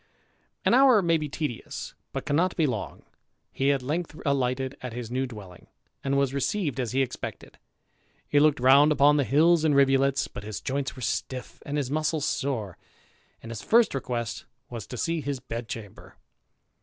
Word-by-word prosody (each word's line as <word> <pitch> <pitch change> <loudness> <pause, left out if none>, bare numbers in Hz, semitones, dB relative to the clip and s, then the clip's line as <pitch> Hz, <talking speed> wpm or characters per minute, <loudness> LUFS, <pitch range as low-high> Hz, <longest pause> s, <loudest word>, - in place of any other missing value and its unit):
An - - +4
hour 255 -5 +6
may 165 -1 +3
be 150 -1 -4
tedious, 145 -5 -5 0.2
but - - -5
cannot 170 +5 +1
be 165 - +2
long. 120 -7 -4 0.5
He 135 +1 +1
at 135 -2 -1
length 155 +3 -3
alighted 130 -1 0
at 125 -2 -6
his 120 -1 -6
new 130 +1 -1
dwelling, 100 -7 -11 0.4
and 140 0 +1
was 140 -1 +1
received 140 - -1
as 125 -3 -1
he 135 +2 +2
expected; 130 - -7 0.7
he 145 - +3
looked 150 -1 +4
round 140 +4 +6
upon 145 0 +5
the 145 - +3
hills 160 +5 +4
and 150 -3 +3
rivulets, 135 0 +3
but - - -8
his 105 0 -5
joints 135 +1 -3
were 130 - -8
stiff 130 +3 -4
and 145 +1 -2
his 135 -3 -2
muscles 155 0 0
sore, 110 - -2 0.6
and 115 - -8
his 115 - -6
first 230 -1 +4
request 120 -4 -3 0.3
was 115 -4 -6
to 125 - -7
see 165 +5 -1
his 140 -2 -3
bed 120 -2 -6
chamber. 105 -4 -9
135 Hz, 180 wpm, -27 LUFS, 125-150 Hz, 0.7 s, hour